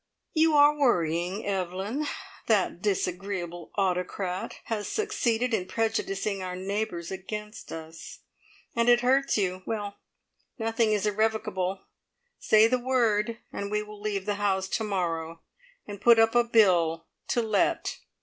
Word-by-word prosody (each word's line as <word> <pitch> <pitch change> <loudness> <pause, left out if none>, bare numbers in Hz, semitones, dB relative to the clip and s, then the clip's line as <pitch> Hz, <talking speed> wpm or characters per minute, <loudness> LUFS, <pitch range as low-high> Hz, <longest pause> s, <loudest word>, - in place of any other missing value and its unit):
"You 315 -1 +4
are 290 +1 +6
worrying, 180 - +1
Evelyn. 195 +8 -2 0.4
That 195 -5 +2
disagreeable 185 -3 -2
autocrat 185 0 -1
has 215 -2 -3
succeeded 250 - 0
in 185 -4 0
prejudicing 205 -2 -1
our 180 -1 -4
neighbours 190 -2 -3
against 210 +3 -7
us, 160 0 -9 0.5
and 235 +1 +3
it 240 0 +6
hurts 265 +2 +2
you. 185 -2 -1
Well, 205 -2 -4 0.6
nothing 225 -1 +1
is 210 -1 +1
irrevocable. 210 -3 0 0.6
Say 215 0 +5
the 250 +2 +1
word, 230 -3 +1 0.2
and 200 - -4
we 210 0 -1
will 210 -1 -12
leave 205 -2 -2
the 205 -1 0
house 190 -2 +1
to 225 - -1
morrow, 165 -5 -2 0.4
and 205 -1 -8
put 235 0 +7
up 225 0 +4
a 240 0 +5
bill 175 -8 +3 0.2
to 240 - +1
let!" 225 - 0
205 Hz, 135 wpm, -27 LUFS, 185-225 Hz, 0.6 s, put